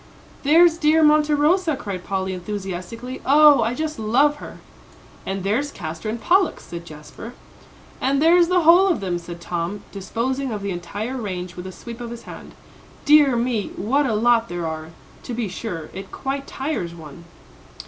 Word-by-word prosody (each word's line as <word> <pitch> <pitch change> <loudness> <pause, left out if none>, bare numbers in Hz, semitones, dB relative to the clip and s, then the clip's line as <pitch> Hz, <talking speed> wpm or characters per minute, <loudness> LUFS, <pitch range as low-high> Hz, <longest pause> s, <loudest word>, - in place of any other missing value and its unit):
"There's 330 +3 +5
dear 315 +1 +4
Monte 300 0 +4
Rosa," 320 +2 +2
cried 195 -7 -6
Polly, 190 -1 -2
enthusiastically. 195 +6 -6
"Oh, 290 -1 +6
I 230 +2 0
just 310 -2 -3
love 270 +7 +2
her." - - -10 0.7
"And 195 -1 -3
there's 245 +9 0
Castor 160 - -6
and 230 +2 -3
Pollux," 370 +6 +2
said 170 0 -8
Jasper. 155 +10 -10 0.7
"And 275 +2 +1
there's 340 +3 +5
the 365 0 +3
whole 345 +4 +6
of 355 - +1
them," 180 -3 -2
said 170 0 -9
Tom, 175 +3 -4
disposing 245 +7 -3
of 210 -2 -4
the 200 - -2
entire 205 +8 -5
range 185 -5 -5
with 180 +1 -7
a - - -7
sweep 235 +5 -10
of 235 - -5
his 235 0 -8
hand. - - -11 0.5
"Dear 290 -3 +6
me, 235 -3 -1
what 270 +7 +1
a 220 - 0
lot 230 +1 +3
there 175 -1 -4
are, 160 0 -5 0.3
to 240 - -6
be 235 -2 -2
sure. 180 -4 -6
It 195 0 -8
quite 275 0 -4
tires 265 - -4
one." 160 0 -12
230 Hz, 175 wpm, -22 LUFS, 185-290 Hz, 0.7 s, Oh